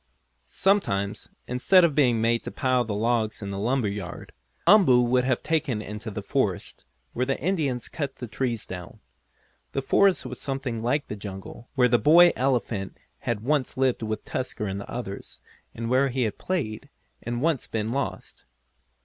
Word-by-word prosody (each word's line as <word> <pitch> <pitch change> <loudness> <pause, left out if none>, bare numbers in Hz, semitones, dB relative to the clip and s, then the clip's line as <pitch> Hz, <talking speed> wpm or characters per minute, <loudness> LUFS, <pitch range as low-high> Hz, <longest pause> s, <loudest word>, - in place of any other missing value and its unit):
Sometimes, 100 - 0 0.2
instead 150 +9 +4
of 170 -3 +3
being 125 -6 +3
made 115 +1 +2
to - - -3
pile 130 -2 +1
the 110 -3 -3
logs 110 0 0
in 100 - -4
the 100 - -4
lumber 120 +2 +1
yard, 100 -3 -6 0.3
Umboo 170 -10 +6
would 125 +1 +2
be 130 - +4
taken 150 -7 0
into 105 +2 -6
the 100 - -6
forest, - - -2 0.3
where 125 +1 -1
the 135 - -1
Indians 145 -8 -1
cut 140 -4 -4
the 125 - -6
trees 115 -1 -2
down. 90 -2 -8 0.7
The 135 - -1
forest 190 +3 +3
was 125 -1 -7
something 135 -4 -3
like 135 +6 0
the - - -5
jungle 100 +3 -9
where 125 -2 +5
the 120 -1 +3
boy 170 +4 +7
elephant 120 -7 -1 0.2
had 115 -3 -2
once 140 +2 0
lived 130 -2 +1
with 110 -1 -3
Tusker 125 -4 -3
and 100 0 -3
the - - -10
others, 115 -5 -6 0.4
and 115 0 -4
where 130 +3 +3
he 130 0 0
had 110 - -3
played, 140 -8 -3 0.3
and 120 +1 -3
once 155 -1 0
been 110 0 -2
lost. 140 +2 -4
125 Hz, 175 wpm, -26 LUFS, 110-135 Hz, 0.7 s, boy